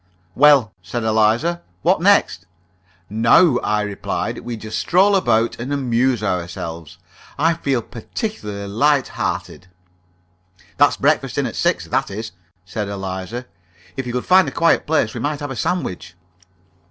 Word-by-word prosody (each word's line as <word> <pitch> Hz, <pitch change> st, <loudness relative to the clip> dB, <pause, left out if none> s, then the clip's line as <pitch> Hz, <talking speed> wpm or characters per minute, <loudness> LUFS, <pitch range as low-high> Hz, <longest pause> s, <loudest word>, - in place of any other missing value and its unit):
"Well," 140 Hz, -6 st, +5 dB
said 95 Hz, +8 st, -4 dB
Eliza, 110 Hz, +10 st, +2 dB, 0.2 s
"what -, -, +3 dB
next?" -, -, +3 dB, 0.6 s
"Now," 115 Hz, -, +4 dB
I 105 Hz, 0 st, 0 dB
replied, 105 Hz, -1 st, -3 dB
"we 120 Hz, -1 st, -6 dB
just 110 Hz, 0 st, -5 dB
stroll 195 Hz, +3 st, +3 dB
about 115 Hz, -11 st, +1 dB
and 125 Hz, +4 st, -5 dB
amuse 125 Hz, -3 st, +1 dB
ourselves. 85 Hz, -3 st, -4 dB, 0.4 s
I 165 Hz, +3 st, +3 dB
feel 135 Hz, -7 st, -1 dB
particularly 110 Hz, -, -6 dB
light 140 Hz, +6 st, +2 dB
hearted." 90 Hz, -, -4 dB, 1.1 s
"That's -, -, +4 dB
breakfasting -, -, +1 dB
at -, -, -5 dB
six, -, -, 0 dB
that -, -, -1 dB
is," 110 Hz, +3 st, -6 dB, 0.3 s
said 100 Hz, +2 st, -4 dB
Eliza. 95 Hz, +4 st, -5 dB, 0.5 s
"If 135 Hz, -2 st, -4 dB
you 120 Hz, -, -4 dB
could 125 Hz, -, -2 dB
find 185 Hz, 0 st, +5 dB
a -, -, -3 dB
quiet 165 Hz, 0 st, +2 dB
place, 150 Hz, -8 st, +1 dB
we 120 Hz, -, -5 dB
might 145 Hz, +4 st, -2 dB
have 145 Hz, -2 st, -5 dB
a -, -, -5 dB
sandwich." 95 Hz, -, -3 dB
115 Hz, 140 wpm, -20 LUFS, 105-145 Hz, 1.1 s, Well